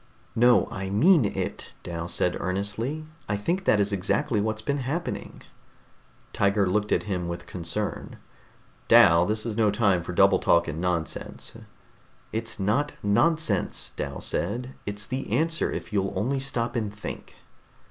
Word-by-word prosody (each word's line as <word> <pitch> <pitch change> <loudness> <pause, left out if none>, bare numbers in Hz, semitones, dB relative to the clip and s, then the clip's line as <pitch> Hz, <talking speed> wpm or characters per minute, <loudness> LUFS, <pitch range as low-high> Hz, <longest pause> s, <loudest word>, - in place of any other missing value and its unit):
"No, 120 +1 +5
I 95 0 -4
mean 150 - +5
it," - - -3 0.2
Dal 85 0 -4
said 90 0 0
earnestly. 105 +11 -3 0.2
"I 100 - +1
think 175 - -1
that 105 - +4
is 100 0 +1
exactly 105 +5 0
what's 110 +1 -2
been 140 +4 -1
happening." 145 +7 -4 0.9
Tiger 100 0 +2
looked 105 +3 0
at - - +2
him 90 -4 -3
with 85 0 -5
concern. 90 +4 -4 0.7
"Dal, 85 +1 +7
this 110 +1 -1
is 115 -3 -3
no 110 -2 +3
time 100 -4 +2
for 85 - -6
double - - +5
talk 85 0 +3
and 80 +2 -4
nonsense." 90 -3 -3 0.8
"It's 115 0 -3
not 115 +10 +1
nonsense," 160 +11 +1
Dal 70 -1 -4
said. 120 +8 -2
"It's 105 0 -3
the 130 0 -4
answer, 160 +7 +1
if - - -6
you'll 95 -1 0
only 135 +5 0
stop 125 -3 -2
and 110 -4 -1
think." 105 0 -8
105 Hz, 150 wpm, -26 LUFS, 95-125 Hz, 0.9 s, Dal